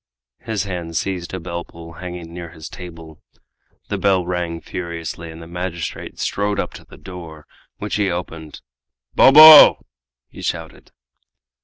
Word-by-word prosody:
His 110 Hz, -4 st, -3 dB
hand 85 Hz, -4 st, -5 dB
seized 90 Hz, -2 st, -3 dB
a 95 Hz, -, -5 dB
bell 85 Hz, 0 st, -6 dB
pull 85 Hz, 0 st, -13 dB
hanging 90 Hz, -1 st, -8 dB
near 85 Hz, -1 st, -8 dB
his 80 Hz, -1 st, -11 dB
table. 80 Hz, -3 st, -11 dB, 0.7 s
The -, -, -3 dB
bell 95 Hz, -3 st, +2 dB
rang 90 Hz, -2 st, -3 dB
furiously, 85 Hz, 0 st, -7 dB
and 80 Hz, 0 st, -11 dB
the 85 Hz, -, -10 dB
magistrate 85 Hz, -1 st, -6 dB
strode 100 Hz, 0 st, -2 dB
up -, -, -3 dB
to -, -, -12 dB
the -, -, -16 dB
door, 85 Hz, -5 st, -11 dB, 0.3 s
which -, -, -4 dB
he 105 Hz, -2 st, +1 dB
opened. 80 Hz, -3 st, -6 dB, 0.5 s
"Bobo!" 155 Hz, +2 st, +9 dB, 0.4 s
he -, -, -13 dB
shouted. -, -, -6 dB
85 Hz, 145 wpm, -20 LUFS, 85-95 Hz, 0.7 s, Bobo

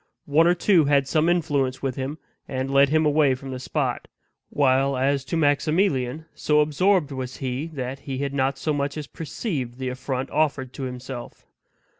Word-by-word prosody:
One 155 Hz, +3 st, +4 dB
or 175 Hz, -, +4 dB
two 175 Hz, -3 st, +4 dB
had 140 Hz, -1 st, +3 dB
some 160 Hz, +3 st, +2 dB
influence 145 Hz, -7 st, 0 dB
with 135 Hz, -2 st, -1 dB
him, 135 Hz, +3 st, -4 dB, 0.3 s
and 130 Hz, +1 st, -3 dB
led 140 Hz, 0 st, +6 dB
him 155 Hz, +1 st, +3 dB
away 150 Hz, -3 st, +3 dB
from 135 Hz, +1 st, -8 dB
the 130 Hz, -, -5 dB
spot; 130 Hz, -, -2 dB, 0.4 s
while 135 Hz, -1 st, +2 dB
as 135 Hz, +1 st, +1 dB
to 165 Hz, -, -2 dB
Maximilian, 150 Hz, -2 st, +1 dB
so 150 Hz, 0 st, +2 dB
absorbed 155 Hz, +1 st, +2 dB
was 130 Hz, -2 st, -5 dB
he 130 Hz, +3 st, -3 dB
that 135 Hz, -4 st, -5 dB
he 135 Hz, -2 st, -5 dB
had 140 Hz, 0 st, -2 dB
not 135 Hz, 0 st, 0 dB
so 155 Hz, +2 st, -1 dB
much 140 Hz, +1 st, -2 dB
as 150 Hz, -, -4 dB
perceived 140 Hz, -, -4 dB
the 130 Hz, -1 st, -3 dB
affront 130 Hz, +1 st, -4 dB
offered 140 Hz, -5 st, 0 dB
to 135 Hz, -, -6 dB
himself. 125 Hz, -1 st, -7 dB
140 Hz, 180 wpm, -24 LUFS, 130-155 Hz, 0.4 s, led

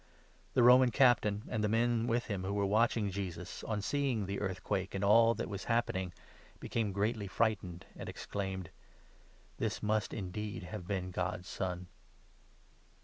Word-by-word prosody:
The 125 Hz, -, +5 dB
Roman 125 Hz, +1 st, +8 dB
Captain, 110 Hz, -4 st, +3 dB
and 110 Hz, -2 st, -1 dB
the 105 Hz, -, +2 dB
men 115 Hz, +1 st, +2 dB
with 120 Hz, +1 st, +1 dB
him 100 Hz, -4 st, -3 dB
54 95 Hz, -, -4 dB
who -, -, -1 dB
were 100 Hz, -1 st, +1 dB
watching 110 Hz, 0 st, +2 dB
Jesus, 90 Hz, -2 st, -5 dB
on 105 Hz, -2 st, -2 dB
seeing 135 Hz, -7 st, 0 dB
the 100 Hz, +1 st, -3 dB
earthquake 95 Hz, 0 st, -2 dB
and 95 Hz, -, -2 dB
all 115 Hz, +3 st, +6 dB
that -, -, -3 dB
was 100 Hz, -1 st, -5 dB
happening, 115 Hz, -6 st, 0 dB, 0.5 s
became 110 Hz, -3 st, -1 dB
greatly 105 Hz, +1 st, -1 dB
frightened 100 Hz, -5 st, -1 dB
and -, -, -7 dB
exclaimed: 95 Hz, -3 st, -4 dB, 0.9 s
"This -, -, -2 dB
must 105 Hz, 0 st, +1 dB
indeed 100 Hz, -1 st, -4 dB
have 90 Hz, -1 st, -7 dB
been 95 Hz, -2 st, -2 dB
God's 90 Hz, +1 st, -3 dB
Son 90 Hz, -1 st, -3 dB
105 Hz, 155 wpm, -33 LUFS, 95-115 Hz, 0.9 s, Roman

